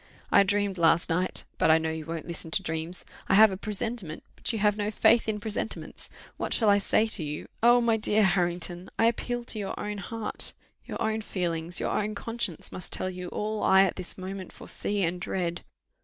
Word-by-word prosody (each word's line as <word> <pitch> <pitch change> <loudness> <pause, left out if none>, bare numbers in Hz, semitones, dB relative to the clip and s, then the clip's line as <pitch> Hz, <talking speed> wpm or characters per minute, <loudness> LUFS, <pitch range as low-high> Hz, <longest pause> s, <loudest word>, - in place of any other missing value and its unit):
I - - +7
dreamed 200 -1 0
last 165 +1 +3
night 180 +3 0 0.2
but - - +4
I 160 - +7
know 160 0 -1
you 160 -1 -6
won't 165 -1 -4
listen 170 -1 -2
to 195 +4 0
dreams; 160 +1 -4 0.2
I - - +5
have 215 0 +8
a - - -3
presentiment 210 -4 -3
but - - -1
you 225 - -2
have 210 -1 +3
no 210 0 -1
faith 225 +1 +4
in 210 -1 -1
presentiments: 215 +1 -5 0.3
what - - 0
shall 220 -4 +4
I 200 - +5
say 215 +2 +2
to 220 -6 -3
you? 150 0 -5
Oh! 240 +1 +6
my 230 -1 +3
dear 215 0 +3
Harrington, 175 -1 0
I 225 - +3
appeal 240 +1 0
to 230 -2 -4
your 195 -2 -4
own 210 -1 -4
heart 220 +3 -2 0.3
your - - -6
own 220 -1 0
feelings, 170 -4 -2
your - - -1
own 210 0 -1
conscience, 225 -5 -2
must 185 - -4
tell 185 - -1
you 180 0 -6
all 215 +3 -3
I 190 0 +6
at 190 - 0
this 185 -2 -3
moment 190 0 -6
foresee 205 -1 -1
and 175 +1 -1
dread. 175 -2 -2
195 Hz, 210 wpm, -28 LUFS, 175-215 Hz, 0.3 s, have